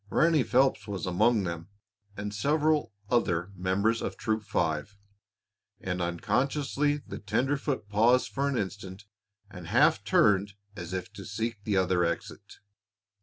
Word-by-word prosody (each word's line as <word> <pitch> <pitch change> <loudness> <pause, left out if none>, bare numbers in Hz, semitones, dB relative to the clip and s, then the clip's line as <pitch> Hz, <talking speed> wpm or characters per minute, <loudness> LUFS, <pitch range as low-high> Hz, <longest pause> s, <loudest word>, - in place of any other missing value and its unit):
Ranny 160 +2 +3
Phelps 130 0 +2
was 100 -4 -4
among 105 +4 +2
them, 85 0 -5 0.5
and 105 +1 -4
several 150 +2 +1 0.2
other 95 -6 +1
members 95 +5 0
of 95 - -4
Troop 110 0 -1
Five, 80 -1 -2 0.8
and 90 -1 -3
unconsciously 140 - 0
the - - -7
tenderfoot 130 +4 -1
paused 115 +5 +3
for 140 +1 -1
an 135 - -1
instant 95 0 -5 0.5
and 90 -4 -9
half 135 - +3
turned 100 -1 +3 0.2
as 85 0 -7
if 95 +1 -5
to 100 0 -9
seek 110 0 -4
the 105 -3 +1
other 90 -1 +2
exit. 85 0 -4
105 Hz, 135 wpm, -28 LUFS, 95-125 Hz, 0.8 s, Ranny